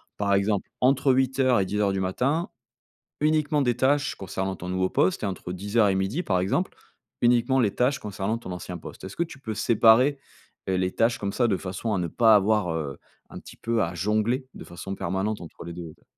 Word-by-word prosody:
Par 100 -1 0
exemple 100 0 +1
entre 135 +1 +3
8:00 130 -1 +2
et 95 - +1
10:00 100 +1 0
du 95 - -1
matin 130 - 0 0.7
uniquement 155 -1 +2
des 120 -3 +1
tâches 145 +2 +2
concernant 95 0 -4
ton 90 - -7
nouveau 95 0 0
poste 95 - +1
et - - +1
entre 95 -2 -4
10:00 105 +4 +1
et 95 - +2
12:00 95 - -1
par 95 - 0
exemple, 95 - -1 0.5
uniquement 120 +2 +3
les 105 -4 +1
tâches 130 +3 +1
concernant 105 +2 -3
ton 105 -5 -8
ancien 90 0 -6
poste. 80 - -11
Est-ce 95 - -8
que 170 - +1
tu 165 -5 -11
peux 110 -5 -5
séparer, 115 +6 +4 0.5
heu, 95 - +1
les 90 0 0
tâches 115 +1 +2
comme 100 -1 -3
ça, 120 +1 +2
de 105 - +2
façon 95 +4 -3
à - - +1
ne 90 -2 -1
pas 110 +6 +5
avoir, 105 -3 +2
heu, 75 -4 -4 0.3
un - - -9
petit - - -13
peu 115 -1 0
à 85 - -3
jongler 110 - 0
de - - -10
façon 85 +3 -7
permanente 95 +5 -2
entre 85 - -10
les 85 - -6
2 85 -2 -8
te - - -31
105 Hz, 215 wpm, -26 LUFS, 95-125 Hz, 0.7 s, pas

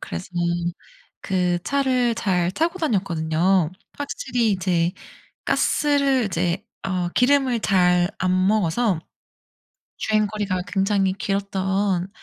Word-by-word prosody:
그래서 185 - -6 0.9
그 180 -2 0
차를 255 -4 +1
잘 180 -6 0
타고 335 - -1
다녔거든요. 180 - +1 0.3
확실히 245 -5 -1
이제 180 -2 0 0.5
가스를 280 -4 +2
이제 180 0 -1 0.2
어 180 -2 -1
기름을 255 +1 +2
잘 180 -3 +3
안 185 0 +1
먹어서 205 -2 +1 1.0
주행거리가 210 -3 0
굉장히 195 -1 +1
길었던 195 -1 -1
195 Hz, 215 characters per minute, -23 LUFS, 180-230 Hz, 1.0 s, 잘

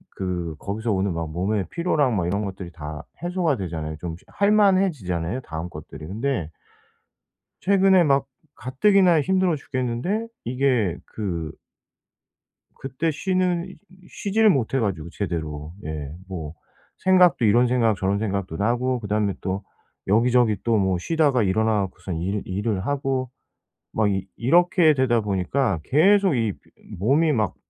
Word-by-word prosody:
그 90 -4 -3
거기서 110 +3 -3
오는 95 -1 0
막 80 -1 -4
몸의 95 +4 -1
피로랑 150 -8 +1
막 90 - 0
이런 100 +4 -1
것들이 95 -3 -6
다 75 -1 -7 0.2
해소가 175 -4 0
되잖아요. 80 -5 -4
좀 85 +1 -5
할 200 +1 +1
만해지잖아요 150 - +2
다음 80 -5 -6
것들이. 75 -1 -10
근데 105 - -2 1.1
최근에 190 -2 +4
막 140 -2 +2 0.3
가뜩이나 175 +5 +3
힘들어 185 +1 +1
죽겠는데 135 - -2 0.2
이게 125 - +1
그 85 -7 -4 1.3
그때 135 +5 -2
쉬는 185 +2 -1 0.3
쉬지를 215 +2 +2
못해 135 - +1
가지고 95 -9 -2
제대로. 80 -5 -4
예. 75 -2 -5 0.2
뭐 80 -5 -6 0.4
생각도 180 -8 +4
이런 120 +4 +5
생각 115 -3 +2
저런 95 +2 0
생각도 100 -5 -3
나고 120 +5 0
그다음에 105 -2 0
또 95 +1 -3 0.4
여기저기 115 +1 +3
또 115 -1 +2
뭐 95 -2 +1
쉬다가 145 - +2
일어나 110 +2 +2
갖고서 95 -1 -5
일 95 +5 -2
일을 95 0 -2
하고 135 -3 -1 0.6
막 110 -2 +2
이 95 -1 -2
이렇게 175 +5 +4
되다 130 -4 +2
보니까 100 - 0
계속 190 - +4
이 115 -4 0 0.5
몸이 145 - +3
막 110 -8 0
110 Hz, 285 characters per minute, -23 LUFS, 95-145 Hz, 1.3 s, 이런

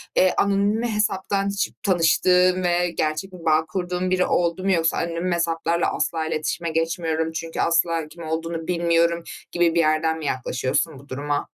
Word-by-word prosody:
eee, 185 0 +4
anonim 200 +3 +2
hesaptan 200 -3 0
hiç 200 0 -1
tanıştığın 180 0 +3
ve 175 0 +2
gerçek 155 +4 -2
bir 170 -2 -11
bağ 160 0 +3
kurduğun 180 +1 -2
biri 185 0 +2
oldu 175 +1 0
mu 195 - +2
yoksa 165 -2 +2
,"Anonim 170 +2 -2
hesaplarla 170 0 0
asla 160 -1 -1
iletişime 165 +2 -2
geçmiyorum 160 0 -1
çünkü 165 0 -5
asla 165 -1 +1
kim 170 +2 -11
olduğunu 165 +1 -4
bilmiyorum." 170 -1 +1 0.3
gibi 175 -1 +2
bir - - +3
yerden 160 0 +2
mi 155 - -7
yaklaşıyorsun 130 +3 -1
bu 140 - -18
duruma? 145 +2 -2
170 Hz, 160 wpm, -23 LUFS, 160-180 Hz, 0.3 s, eee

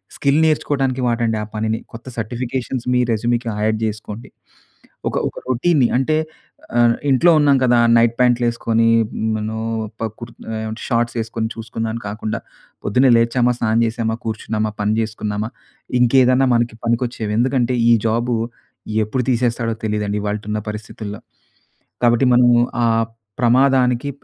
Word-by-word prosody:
Skill 140 +2 +2
నేర్చుకోడానికి 135 -4 0
వాడండి 115 -2 0
ఆ - - -5
పనిని. 110 +1 -1
కొత్త 115 - -10
సర్టిఫికేషన్స్ 120 +2 -3
మీ 125 - +3
రెజ్యూ‌మ్‌కి 120 +2 -1 0.2
యాడ్ 110 0 +1
చేసుకోండి. 105 +2 -7 0.8
ఒక - - -2
ఒక - - -18
రొటీన్‌ని 130 0 +3
అంటే 155 +4 +1 0.6
ఆహ్, 120 -1 +4
ఇంట్లో 150 +6 +5
ఉన్నాం 145 -2 +4
కదా! 120 -1 +4 0.2
నైట్ 115 0 +4
ప్యాంట్లేసుకొని 120 -2 +2 0.5
మనం 110 +1 -3 0.4
ప - - -3 0.2
క్రు 115 -1 -8 0.3
ఏమ 110 - -4 0.2
షార్ట్స్ 120 -1 0
వేసుకొని 115 0 -2
చూసుకుందామని 115 0 -4
కాకుండా 105 +1 -4 0.4
పొద్దున్నే 125 +6 +3
లేచామా! 120 +1 +2
స్నానం 115 -1 +1
చేశామా! 115 0 -1
కూర్చున్నామా! 110 -1 -2
పని 105 +1 +1
చేసుకున్నామా! 110 0 -3 0.5
ఇంకేదన్నా 130 +1 +4
మనకి 120 -1 0
పనికొచ్చేవి. 115 -2 -1
ఎందుకంటే 125 0 +1
ఈ - - +6
జాబు 120 +2 +1 0.7
ఎప్పుడు 125 +4 -2
తీసేస్తాడో 120 -2 0
తెలీదండి. 105 -1 -1
ఇవాల్టున్న 105 +1 -3
పరిస్థితుల్లో. 105 -1 -7 0.8
కాబట్టి 120 +2 +4
మనం 120 0 +5 0.4
ఆ - - +4 0.5
ప్రమాదానికి 125 +1 +3
115 Hz, 125 wpm, -19 LUFS, 110-125 Hz, 0.8 s, ఈ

